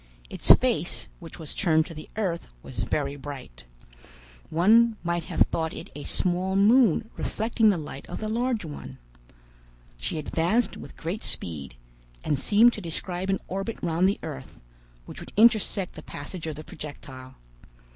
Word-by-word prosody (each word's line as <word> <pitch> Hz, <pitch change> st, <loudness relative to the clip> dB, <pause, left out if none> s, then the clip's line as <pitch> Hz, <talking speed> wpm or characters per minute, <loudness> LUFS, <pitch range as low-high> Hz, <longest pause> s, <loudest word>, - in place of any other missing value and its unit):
Its -, -, -4 dB
face, -, -, -1 dB
which -, -, -10 dB
was 155 Hz, -3 st, -7 dB
turned 160 Hz, -4 st, +3 dB
to 165 Hz, -, -9 dB
the 155 Hz, 0 st, -9 dB
earth, 185 Hz, -6 st, -1 dB, 0.2 s
was -, -, -8 dB
very 140 Hz, -1 st, -1 dB
bright. 135 Hz, -, -9 dB, 0.8 s
One 220 Hz, +7 st, +5 dB
might 170 Hz, -1 st, -1 dB
have -, -, -4 dB
thought 160 Hz, -1 st, +2 dB
it -, -, -8 dB
a 145 Hz, -, -7 dB
small 185 Hz, +4 st, 0 dB
moon 220 Hz, 0 st, +5 dB
reflecting 225 Hz, 0 st, +2 dB
the 195 Hz, -, +3 dB
light 150 Hz, -2 st, -8 dB
of -, -, -5 dB
the 215 Hz, -, -3 dB
large 230 Hz, -2 st, 0 dB
one. 65 Hz, -, -8 dB, 1.0 s
She 65 Hz, -, -2 dB
advanced 170 Hz, +10 st, +1 dB
with -, -, -10 dB
great 175 Hz, +7 st, -3 dB
speed, 70 Hz, -7 st, -3 dB, 0.5 s
and 145 Hz, -, 0 dB
seemed 220 Hz, +9 st, +5 dB
to 210 Hz, -, -6 dB
describe 180 Hz, +2 st, -3 dB
an 195 Hz, -, +1 dB
orbit 195 Hz, +4 st, -3 dB
round 170 Hz, +2 st, +3 dB
the 200 Hz, -, -1 dB
earth, 65 Hz, -, -7 dB, 0.5 s
which -, -, -9 dB
would -, -, -10 dB
intersect 215 Hz, -4 st, +4 dB
the 155 Hz, -, -9 dB
passage 160 Hz, +3 st, -7 dB
of 155 Hz, -, -3 dB
the 155 Hz, -, -8 dB
projectile. 130 Hz, -4 st, -9 dB
170 Hz, 160 wpm, -27 LUFS, 150-210 Hz, 1.0 s, One